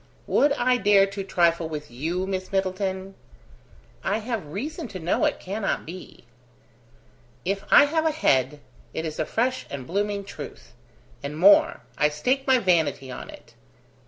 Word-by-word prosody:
"Would 290 Hz, -, +3 dB
I 250 Hz, -2 st, +2 dB
dare 205 Hz, -4 st, +5 dB
to 195 Hz, 0 st, -5 dB
trifle 170 Hz, -3 st, +1 dB
with 150 Hz, -3 st, -6 dB
you, 165 Hz, +9 st, -2 dB
Miss 190 Hz, -1 st, -4 dB
Middleton?" 190 Hz, 0 st, -2 dB, 0.9 s
"I 200 Hz, -, +1 dB
have 225 Hz, -6 st, -4 dB
reason 295 Hz, -, -5 dB
to 185 Hz, -, -8 dB
know 170 Hz, +1 st, +1 dB
it -, -, 0 dB
cannot 200 Hz, +2 st, -3 dB
be." 180 Hz, -3 st, -10 dB, 1.2 s
"If 195 Hz, +2 st, -1 dB
I 290 Hz, -, +8 dB
have 320 Hz, +2 st, +1 dB
a -, -, +2 dB
head, 145 Hz, -, +1 dB, 0.3 s
it 160 Hz, -, -2 dB
is 155 Hz, -1 st, -5 dB
a 155 Hz, -, -1 dB
fresh 255 Hz, +3 st, -1 dB
and 135 Hz, -2 st, -6 dB
blooming 200 Hz, +4 st, -1 dB
truth. 200 Hz, -, -10 dB, 0.5 s
And 150 Hz, +2 st, -5 dB
more 195 Hz, +5 st, +5 dB, 0.2 s
I 150 Hz, -, +4 dB
stake 255 Hz, -, -1 dB
my 260 Hz, -1 st, +6 dB
vanity 160 Hz, -, +1 dB
on -, -, -8 dB
it!" -, -, -13 dB
190 Hz, 160 wpm, -25 LUFS, 160-220 Hz, 1.2 s, I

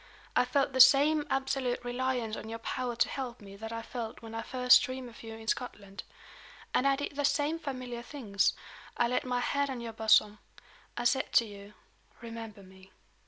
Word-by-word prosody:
I -, -, +4 dB
felt 270 Hz, +2 st, +1 dB
the 260 Hz, -, -1 dB
same 295 Hz, +3 st, +6 dB
absolute 270 Hz, -2 st, -1 dB
reliance 245 Hz, -2 st, -1 dB
on 220 Hz, -, -8 dB
your 225 Hz, -, -4 dB
power 245 Hz, +1 st, -3 dB
to 245 Hz, -, +3 dB
help 250 Hz, -3 st, -5 dB
me 200 Hz, -1 st, -12 dB
that 225 Hz, +2 st, -7 dB
I 230 Hz, 0 st, -5 dB
felt 230 Hz, -1 st, -6 dB
when 225 Hz, 0 st, -9 dB
I 225 Hz, -, -3 dB
first 250 Hz, 0 st, +5 dB
dreamed 255 Hz, -2 st, -5 dB
of 230 Hz, -, -14 dB
you 225 Hz, -1 st, -8 dB
in 220 Hz, 0 st, -11 dB
Scotland. 200 Hz, -5 st, -4 dB, 0.7 s
And 275 Hz, -, +3 dB
I 275 Hz, -, +4 dB
did 285 Hz, +1 st, -5 dB
the 290 Hz, -, -1 dB
same 290 Hz, +3 st, +1 dB
familiar 255 Hz, -5 st, -5 dB
things. 230 Hz, -6 st, 0 dB, 0.4 s
I 240 Hz, -, +3 dB
laid 250 Hz, +2 st, -1 dB
my 250 Hz, -1 st, 0 dB
hand 280 Hz, +2 st, 0 dB
on 260 Hz, -2 st, -4 dB
your 230 Hz, -1 st, -6 dB
bosom. 215 Hz, -1 st, +4 dB, 0.6 s
I 240 Hz, -, -2 dB
said 265 Hz, +2 st, +1 dB
to 235 Hz, -, +5 dB
you: 205 Hz, -1 st, -12 dB, 0.4 s
'Remember 225 Hz, -3 st, -8 dB
me. 190 Hz, 0 st, -17 dB
245 Hz, 195 wpm, -30 LUFS, 225-265 Hz, 0.7 s, same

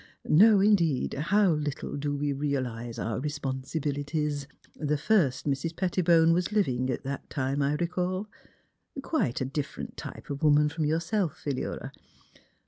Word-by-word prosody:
No, 205 Hz, +6 st, +7 dB
indeed, 180 Hz, -9 st, +3 dB
how 190 Hz, +6 st, +3 dB
little 150 Hz, -2 st, -2 dB
do 145 Hz, 0 st, -2 dB
we 145 Hz, 0 st, -1 dB
realize 125 Hz, -5 st, -3 dB
our 115 Hz, 0 st, -2 dB
responsibilities. 145 Hz, +1 st, -2 dB, 0.3 s
The 150 Hz, -1 st, -1 dB
first 145 Hz, -, +2 dB
Mrs. 150 Hz, +4 st, -1 dB
Pettibone 170 Hz, -3 st, +3 dB
was 180 Hz, +3 st, 0 dB
living 130 Hz, -, +1 dB
at 125 Hz, -, -2 dB
that 140 Hz, +1 st, -5 dB
time, 135 Hz, 0 st, -1 dB
I 140 Hz, +1 st, +2 dB
recall; 180 Hz, +4 st, -2 dB, 0.8 s
quite 135 Hz, -, 0 dB
a -, -, +1 dB
different 140 Hz, +2 st, -5 dB
type -, -, -8 dB
of 140 Hz, -, -4 dB
woman 150 Hz, -1 st, +4 dB
from 155 Hz, 0 st, -2 dB
yourself, 165 Hz, +3 st, 0 dB
Philura. 140 Hz, -3 st, -4 dB
150 Hz, 135 wpm, -28 LUFS, 140-170 Hz, 0.8 s, No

